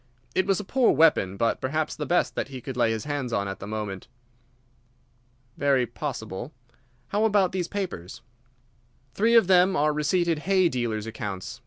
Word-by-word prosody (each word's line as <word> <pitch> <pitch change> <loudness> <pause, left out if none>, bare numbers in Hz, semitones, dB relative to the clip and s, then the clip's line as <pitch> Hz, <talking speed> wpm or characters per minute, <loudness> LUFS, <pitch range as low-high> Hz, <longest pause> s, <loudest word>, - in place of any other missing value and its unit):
It 185 - +1
was 195 -1 +2
a - - -4
poor 250 +5 +3
weapon, 135 - +3
but 115 +1 0
perhaps 155 +4 -1
the 150 - -5
best 175 - +1
that - - -3
he 135 -2 -8
could 130 +1 -7
lay 120 -2 +2
his 110 -1 -2
hands 145 -4 -3
on 100 -3 -1
at 95 -1 -6
the 95 - -7
moment." 105 -3 -5 1.5
"Very 135 -3 +2
possible. 120 -2 -6 0.6
How 210 +6 0
about 205 -4 +3
these 180 -2 -2
papers?" 180 - -5 0.9
"Three 225 - +3
of 230 - +7
them 185 +1 +4
are 150 +1 +2
receipted 165 +2 +1
hay 185 +1 +2
dealers' 115 -5 -2
accounts. 105 -4 -6
145 Hz, 170 wpm, -26 LUFS, 110-185 Hz, 1.5 s, of